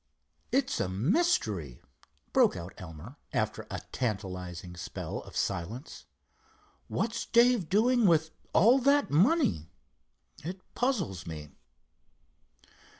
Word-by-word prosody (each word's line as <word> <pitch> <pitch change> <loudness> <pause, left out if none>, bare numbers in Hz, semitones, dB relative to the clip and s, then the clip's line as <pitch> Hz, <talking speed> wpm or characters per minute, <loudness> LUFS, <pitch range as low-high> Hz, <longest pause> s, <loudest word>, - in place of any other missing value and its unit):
"It's 270 +1 +1
a 90 - 0
mystery," 105 - +1 0.5
broke - - +5
out 85 +3 -7
Elmer, 90 - -10 0.2
after - - -1
a - - -4
tantalizing 90 -6 -4
spell 85 - -5
of - - -12
silence. 115 - -3 0.8
"What's 230 +1 -2
Dave 235 -6 +4
doing 235 +2 +4
with 160 -2 +3 0.2
all 235 +9 +6
that 280 +2 +3
money? 175 - +3 0.7
It 185 +4 -5
puzzles 185 - -1
me." 75 -2 -7
155 Hz, 100 wpm, -30 LUFS, -, 0.8 s, all